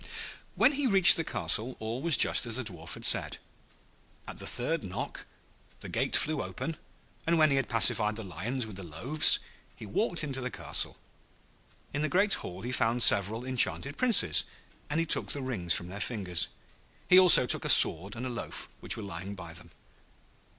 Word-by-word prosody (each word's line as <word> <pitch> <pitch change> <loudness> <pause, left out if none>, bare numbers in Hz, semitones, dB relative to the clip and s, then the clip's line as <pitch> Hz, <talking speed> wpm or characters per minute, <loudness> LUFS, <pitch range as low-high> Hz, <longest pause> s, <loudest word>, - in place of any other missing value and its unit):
When - - +2
he 285 -1 -2
reached 195 -5 +7
the 165 - -3
castle 110 - 0
all 115 +3 -7
was 165 -1 +1
just 125 - +2
as 115 - -2
the 130 - -4
Dwarf 90 -7 -8
had - - -5
said. - - +2 0.9
At - - -11
the - - -8
third 150 +4 -2
knock 95 -2 -8 0.5
the - - -10
gate - - -1
flew 155 -3 0
open, 165 -1 -8 0.5
and 170 0 0
when 155 -2 +2
he - - 0
had 135 - -3
pacified 110 -2 +2
the 110 - -7
Lions 105 - -5
with 105 -4 -12
the 95 - -10
loaves, 120 - +2 0.4
he - - -12
walked 170 - -2
into 135 -3 -6
the 125 - -5
castle. - - -3 1.0
In 145 - -4
the 155 - -3
great 200 +2 +1
hall 90 +3 -5
he 125 - -6
found 120 -1 0
several 105 +4 +3
enchanted 130 +2 0
Princes, 235 - +3 0.5
and 150 +2 -3
he 165 - -2
took 155 - +2
the 145 - -5
rings 95 -10 -1
from 85 - -4
their 100 +2 -10
fingers. 90 -5 -2 0.6
He 180 - +5
also 180 -8 +7
took - - 0
a - - -5
sword 95 +7 +7
and 120 +2 -8
a - - -5
loaf, 120 - -8
which - - -3
were 110 - -8
lying 95 +1 -9
by 85 -3 -12
them. 85 0 -14
120 Hz, 190 wpm, -27 LUFS, 100-150 Hz, 1.0 s, reached